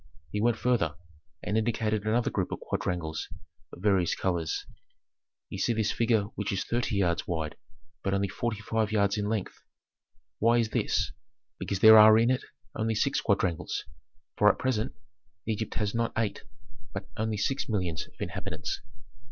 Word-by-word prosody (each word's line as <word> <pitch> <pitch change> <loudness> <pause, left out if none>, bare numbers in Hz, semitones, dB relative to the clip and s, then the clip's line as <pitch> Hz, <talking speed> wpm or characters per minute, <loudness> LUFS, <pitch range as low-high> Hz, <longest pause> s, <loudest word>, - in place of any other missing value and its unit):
He 105 - -1
went 115 0 +2
farther, 110 -13 +1 0.5
and 105 +2 +1
indicated 110 -2 0
another 115 +2 +2
group - - -1
of - - -3
quadrangles 80 -3 -3 0.4
of 90 - -11
various 95 -5 +3
colors. 85 -4 -1 0.8
"Ye - - -6
see 120 - +2
this 110 -2 +1
figure 115 -2 +2
which 105 - -3
is 95 - -1
thirty 120 -1 -1
yards 90 -4 +1
wide, 80 -3 -2 0.5
but 95 - -1
only 100 0 +1
forty 110 +2 -3
five 110 0 0
yards 100 -1 +2
in 105 0 -1
length. 110 -4 -3 0.8
Why 115 +2 +4
is 115 -2 +1
this? - - 0 0.5
Because 95 - -3
there 110 0 +10
are 110 0 +9
in 115 +2 +4
it 130 - 0 0.3
only 110 0 -1
six 105 - +1
quadrangles, 85 -3 0 0.5
for - - +6
at - - -10
present 125 -2 -1 0.5
Egypt 110 -1 -2
has 105 -2 -1
not 115 0 0
eight, 110 -2 -1 0.5
but 100 - -5
only 110 0 -1
six 135 +7 -1
millions 90 -7 -1
of - - -26
inhabitants. - - -4
110 Hz, 160 wpm, -29 LUFS, 95-115 Hz, 0.8 s, there